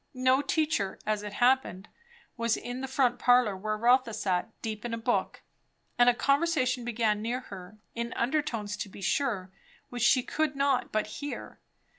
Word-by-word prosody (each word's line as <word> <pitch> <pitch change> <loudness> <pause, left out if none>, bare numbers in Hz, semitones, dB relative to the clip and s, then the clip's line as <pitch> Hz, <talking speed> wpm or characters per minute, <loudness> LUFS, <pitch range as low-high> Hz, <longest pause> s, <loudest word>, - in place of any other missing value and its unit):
No 255 +1 +3
teacher, 290 -9 0
as 215 -1 0
it 210 0 -7
happened, 245 -5 +1 0.5
was 230 -1 0
in 245 +1 -6
the 265 - -3
front 255 -2 +1
parlour 245 -5 +4
where 215 +3 -3
Rotha 240 0 +3
sat, 190 -2 -1
deep 215 -2 -4
in 235 -1 -3
a - - -6
book; 240 +2 -1 0.5
and 245 0 +6
a - - +4
conversation 275 -3 +1
began 220 -3 0
near 240 +3 -2
her, 185 -3 -11 0.2
in 235 0 -4
under 270 +6 +1
tones 220 -8 -4
to 200 - -5
be 195 - -12
sure, 195 -4 -1 0.4
which 245 -1 -6
she 250 +2 +4
could 310 +1 -1
not 275 -2 +1
but 215 0 0
hear. 285 +7 -7
240 Hz, 175 wpm, -29 LUFS, 215-260 Hz, 0.5 s, and